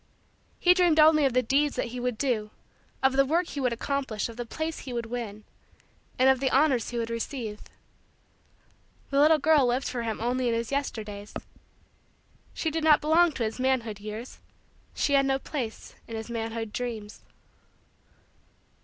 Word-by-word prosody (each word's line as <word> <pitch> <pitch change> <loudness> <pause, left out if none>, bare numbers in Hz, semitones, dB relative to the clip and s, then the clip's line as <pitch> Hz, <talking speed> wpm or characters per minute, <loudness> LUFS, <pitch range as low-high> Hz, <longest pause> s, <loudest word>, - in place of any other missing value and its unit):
He 360 - +6
dreamed 350 -4 +3
only 305 -1 +6
of 265 - +1
the 255 0 +3
deeds 280 +4 +1
that 240 - -2
he 250 +1 -6
would 245 -2 -2
do; 220 -5 -1 0.5
of 265 0 +4
the 275 +1 +4
work 330 +6 0
he 285 - -5
would 250 -2 +1
accomplish; 240 -2 -2
of 230 - -9
the 240 0 -6
place 315 +5 -4
he 255 - -7
would 235 -1 -2
win; 225 -3 -6 0.7
and 255 - +4
of 265 -1 +5
the 265 0 +1
honors 265 -4 +2
he 240 - -4
would 230 0 -2
receive. 230 -2 -4 1.5
The 275 - +2
little 310 +2 +6
girl 295 -2 +4
lived 250 +3 0
for 245 -1 -3
him 225 -2 -3
only 245 +2 0
in 230 - +1
his 230 +1 -3
Yesterdays. 215 -7 -4 1.2
She 320 - -2
did 320 +1 -2
not 310 -2 +6
belong 330 +3 +4
to 250 - -2
his 220 +3 -3
manhood 245 -5 0
years. 215 +4 -8 0.6
She 285 - 0
had 275 -1 +4
no 270 0 +2
place 260 -5 -6
in 230 - -6
his 225 +1 -6
manhood 225 -1 -4
dreams. 225 -4 -5
250 Hz, 175 wpm, -27 LUFS, 230-280 Hz, 1.5 s, He